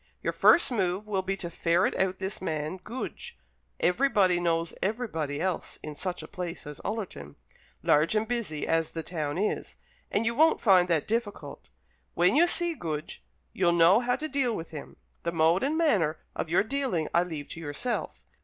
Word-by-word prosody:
Your - - 0
first 340 - +5
move 195 -2 -1
will 195 -2 0
be 195 +1 -2
to 170 - -4
ferret 170 +2 +1
out 190 0 0
this 190 0 -5
man 155 0 -3
Goodge. 230 - -7 0.4
Everybody 195 -4 +3
knows 165 -1 0
everybody 175 - -2
else 180 0 -2
in 155 - -6
such 180 +4 -4
a - - -8
place 180 -3 -6
as 150 -1 -8
Ullerton, 190 - -5 0.5
large 155 +7 +3
and 215 +1 +1
busy 225 -11 -2
as 165 -1 0
the 165 - -4
town 155 -3 -3
is, 210 +3 -2 0.3
and 215 - 0
you 230 - +2
won't 315 +6 +4
find 185 -5 +5
that 165 -4 +1
difficult. 225 -2 -4 0.5
When 180 +3 +4
you 340 +4 +6
see 345 0 +1
Goodge, 155 - -5 0.3
you'll 175 -2 +2
know 170 +5 +6
how 245 0 +1
to 310 - -4
deal 270 -6 0
with 165 -2 -7
him. 150 -3 -8 0.3
The 170 - -2
mode 165 +2 +3
and 290 +4 0
manner 190 - +2 0.2
of - - -3
your 175 +4 +3
dealing 235 - -1
I 170 - +5
leave 160 -5 -5
to - - -7
yourself. 165 +11 -3
180 Hz, 180 wpm, -28 LUFS, 165-225 Hz, 0.5 s, you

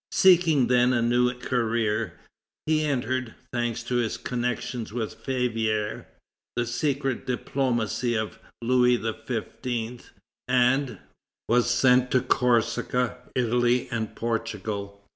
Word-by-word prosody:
Seeking 170 -7 +5
then 125 +1 +3
a 120 - +2
new 120 +1 +3
career, 115 -6 -1 0.5
he 155 0 +2
entered, 130 -3 -1 0.2
thanks 120 -1 -1
to 125 +1 -1
his 115 -2 0
connection 125 -1 -3
with 115 -1 -3
Favier, 110 -5 -1 0.5
the 120 - 0
secret 135 +2 -1
diplomacy 125 -2 0
of 110 -1 -3 0.2
Louis 125 0 +4
XV., 115 +1 -4 0.4
and 125 +2 +2 0.5
was 120 +1 +3
sent 125 +1 +4
to 130 - +3
Corsica, 120 +1 +1 0.2
Italy, 120 0 +2
and 110 -3 -3
Portugal. 105 -3 -3
120 Hz, 105 wpm, -26 LUFS, 115-125 Hz, 0.5 s, Seeking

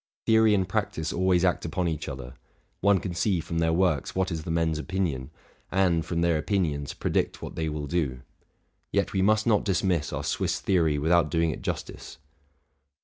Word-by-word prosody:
Theory 110 -1 +5
and 95 -2 0
practice 95 -6 -2
always 95 0 +2
act 90 - +1
upon 90 +2 -1
each 80 -2 -3
other: - - -7 0.5
one 100 -1 +4
can 90 -1 -4
see 85 +2 +1
froin 85 +1 -3
their 80 0 +2
works 85 -4 +1
what 95 0 0
is 80 -2 -4
the - - -5
men's 80 -1 0
opinion, 80 -7 -2 0.4
and, 90 -4 +2
from 85 0 -2
their 85 -2 +2
opinions, 75 -5 -1
predict - - -1
what - - -7
they 80 -1 -1
will 75 -1 -4
do. 70 -6 -1 0.7
Yet - - 0
we 95 - +1
must 110 +2 +3
not 110 -4 +3
dismiss 90 -5 0
our - - -3
Swiss - - -1
theory 80 -6 +2
without 80 +1 +3
doing 80 0 +1
it - - -7
justice. - - -5
85 Hz, 185 wpm, -27 LUFS, 80-95 Hz, 0.7 s, Theory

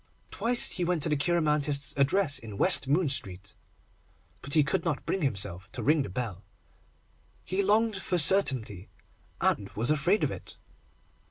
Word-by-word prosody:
Twice 240 +1 +3
he 180 - -2
went 175 -3 -1
to - - +1
the 150 - +1
cheiromantist's 150 -3 0
address 145 +3 +1
in 105 -3 -10
West 180 - +1
Moon 155 +5 +1
Street, 95 -8 -1 0.9
but 140 +2 -1
he 155 - +5
could 165 +5 -2
not 160 -4 -3
bring 195 - -2
himself 95 - -2
to - - -5
ring 150 +1 +2
the 135 - -5
bell. 100 -1 -6 1.0
He 190 +2 -1
longed 215 +1 +1
for 185 -1 -2
certainty, 135 - +2 0.5
and - - 0
was 115 +7 0
afraid 165 +8 +1
of - - 0
it. - - -10
150 Hz, 160 wpm, -27 LUFS, 125-180 Hz, 1.0 s, he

